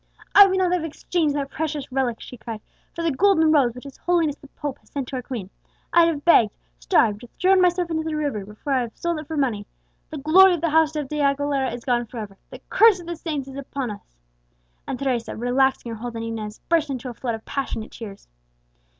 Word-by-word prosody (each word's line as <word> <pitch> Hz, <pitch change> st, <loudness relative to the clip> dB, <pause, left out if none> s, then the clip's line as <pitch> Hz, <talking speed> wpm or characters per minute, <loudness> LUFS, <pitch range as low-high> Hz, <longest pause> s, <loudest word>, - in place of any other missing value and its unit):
"I 405 Hz, 0 st, +10 dB
would 380 Hz, 0 st, 0 dB
not 370 Hz, -2 st, +2 dB
have 360 Hz, -3 st, +1 dB
exchanged 320 Hz, -1 st, -1 dB
that 280 Hz, -1 st, -3 dB
precious 300 Hz, -4 st, -3 dB
relic," 255 Hz, -3 st, 0 dB
she -, -, -10 dB
cried, 225 Hz, -2 st, -7 dB, 0.3 s
"for 335 Hz, -, -3 dB
the 330 Hz, -, +2 dB
Golden 320 Hz, +1 st, +4 dB
Rose 260 Hz, -6 st, +3 dB
which 250 Hz, -, -10 dB
his 275 Hz, -1 st, -11 dB
Holiness 335 Hz, -5 st, +1 dB
the 280 Hz, -, -16 dB
Pope 285 Hz, -1 st, -6 dB
has -, -, -27 dB
sent 275 Hz, -3 st, -4 dB
to 265 Hz, -, -4 dB
our -, -, -3 dB
queen! 230 Hz, -7 st, -6 dB, 0.4 s
I'd 340 Hz, -1 st, +6 dB
have 300 Hz, -4 st, -2 dB
begged 235 Hz, -10 st, +6 dB, 0.3 s
starved 205 Hz, -, +2 dB, 0.2 s
thrown 375 Hz, +1 st, +5 dB
myself 355 Hz, -1 st, +2 dB
into 320 Hz, -1 st, 0 dB
the 315 Hz, -1 st, -3 dB
river 285 Hz, -9 st, -2 dB
before 210 Hz, +8 st, -5 dB
I'd 260 Hz, -, +3 dB
have 235 Hz, -2 st, -6 dB
sold 340 Hz, -2 st, -1 dB
it 305 Hz, -, -9 dB
for 320 Hz, 0 st, -4 dB
money! 230 Hz, -8 st, -1 dB, 0.4 s
The 310 Hz, -, -6 dB
glory 355 Hz, +6 st, +6 dB
of 330 Hz, -, -7 dB
the 330 Hz, -2 st, 0 dB
house 320 Hz, 0 st, +3 dB
of 295 Hz, -3 st, -2 dB
De 300 Hz, +2 st, -4 dB
Aguilera 280 Hz, -2 st, +1 dB
is 240 Hz, 0 st, -7 dB
gone 240 Hz, -2 st, +1 dB
for 240 Hz, -, -10 dB
ever! 210 Hz, -3 st, -6 dB
The -, -, -11 dB
curse 435 Hz, -4 st, +5 dB
of 345 Hz, -, -10 dB
the 340 Hz, 0 st, -4 dB
saints 305 Hz, -4 st, -4 dB
is 270 Hz, 0 st, -9 dB
upon 275 Hz, -3 st, -4 dB
us!" 200 Hz, -, -12 dB, 0.7 s
And 255 Hz, -, -3 dB
Teresa, 255 Hz, -4 st, -2 dB
relaxing 245 Hz, +1 st, +1 dB
her 225 Hz, -, -5 dB
hold 240 Hz, 0 st, -6 dB
on 225 Hz, -, -4 dB
Inez, 220 Hz, -2 st, -5 dB
burst 325 Hz, -3 st, +2 dB
into 255 Hz, -2 st, -4 dB
a -, -, -6 dB
flood 235 Hz, 0 st, -3 dB
of 220 Hz, -, -12 dB
passionate 250 Hz, -5 st, -4 dB
tears. 205 Hz, -4 st, -10 dB
275 Hz, 235 wpm, -23 LUFS, 240-320 Hz, 0.7 s, I